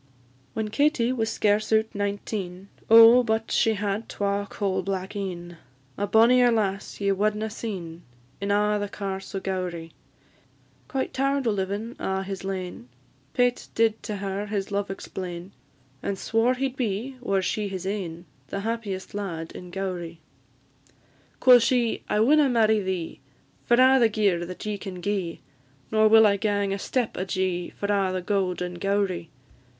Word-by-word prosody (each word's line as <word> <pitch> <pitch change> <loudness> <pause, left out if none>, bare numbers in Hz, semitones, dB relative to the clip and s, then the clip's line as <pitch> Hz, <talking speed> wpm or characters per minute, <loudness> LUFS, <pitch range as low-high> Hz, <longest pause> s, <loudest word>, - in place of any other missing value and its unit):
"_ - - -37 0.5
When 220 -1 -2
Katie 250 -1 +2
was 225 -3 -1
scarce 210 0 +1
out 220 0 +2
nineteen, 200 -2 -4 0.2
Oh, 230 +2 +9
but 220 -1 -1
she 225 -1 +3
had 205 +1 -2
twa 200 0 -1
coal 195 -3 -1
black 190 +1 -4
een! 175 -3 -5 0.4
A 205 - -2
bonnier 240 +3 +5
lass 200 -3 -1
ye 200 -1 +1
wadna 210 +2 0
seen 180 -7 -6 0.4
In 200 - -2
a' 210 +1 +2
the 205 0 -3
Carse 195 -1 -5
o' - - 0
Gowrie. 180 -4 -4 1.0
Quite 270 -2 -2
tired 275 0 0
o' 225 - +3
livin' 205 +4 -3
a' 190 0 -1
his 195 0 -6
lane, 185 -10 -5 0.5
Pate 245 0 +1
did 225 -1 +2
to 210 - -4
her 200 +1 -3
his 200 -1 -3
love 200 0 -1
explain, 185 -1 -6 0.5
And 200 - -2
swore 225 +5 +1
he 270 +1 0
'd 260 - -16
be, 240 +3 -2
were 195 -5 0
she 210 +3 -1
his 190 -2 -5
ain, 180 -4 -4 0.2
The 195 - -4
happiest 215 -4 -4
lad 170 -5 -4
in 180 - -9
Gowrie. 175 -3 -4 1.2
Quo' 250 -1 +8
she, 235 0 +1
"I 210 - +2
winna 290 +4 +5
marry 220 -3 +3
thee, 185 -3 -4 0.5
For 240 - +4
a' 260 +2 +6
the 230 -2 +5
gear 200 -5 +1
that 185 +3 -8
ye 210 -1 -3
can 190 -3 -7
gi'e; 190 -3 -2 0.5
Nor 215 0 +5
will 220 0 +7
I 200 -1 +4
gang 205 -1 0
a 200 - -3
step 245 +2 -1
ajee, 185 -1 -1
For - - -2
a' 195 -2 +1
the 185 -1 -3
gowd 185 -2 0
in 175 -1 -6
Gowrie. 195 -4 -1
200 Hz, 165 wpm, -25 LUFS, 190-220 Hz, 1.2 s, Oh